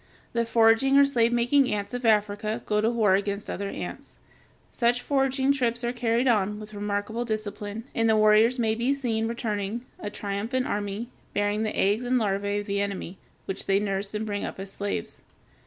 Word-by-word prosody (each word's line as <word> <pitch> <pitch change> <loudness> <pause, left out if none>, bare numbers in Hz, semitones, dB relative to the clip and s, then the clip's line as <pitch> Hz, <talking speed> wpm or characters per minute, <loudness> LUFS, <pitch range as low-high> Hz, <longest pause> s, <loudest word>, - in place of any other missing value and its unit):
The 235 0 +1
foraging 230 +4 +4
or 280 - +8
slave 235 -4 +2
making 245 +3 +3
ants 205 0 -3
of 245 0 -3
Africa 210 0 +1
go 210 0 +1
to 220 - +2
war 220 -5 +3
against 200 +1 -1
other 200 0 -3
ants. - - -7 0.5
Such 240 0 +2
foraging 270 -1 +2
trips 240 -3 -1
are 240 +1 -1
carried 240 +1 +1
on 210 -3 +2
with 215 0 -10
remarkable 205 +3 -2
discipline, 215 -1 -4
and 225 0 +2
the 220 - +4
warriors 215 +3 +5
may 225 -2 +1
be 240 +5 +1
seen 230 -5 -1
returning, 225 0 -3
a 205 - -4
triumphant 210 +5 -2
army, 205 +3 -3 0.3
bearing 205 +1 +1
the 215 -1 -2
eggs 205 +5 +2
and 250 +1 +2
larvæ 200 -1 0
of - - -9
the 200 0 -1
enemy, 195 -2 -4 0.3
which 195 - -4
they 195 - +4
nurse 200 0 -2
and 215 +1 -2
bring 205 -1 -3
up - - -5
as 195 0 -7
slaves. 200 0 -4
215 Hz, 190 wpm, -26 LUFS, 205-240 Hz, 0.5 s, or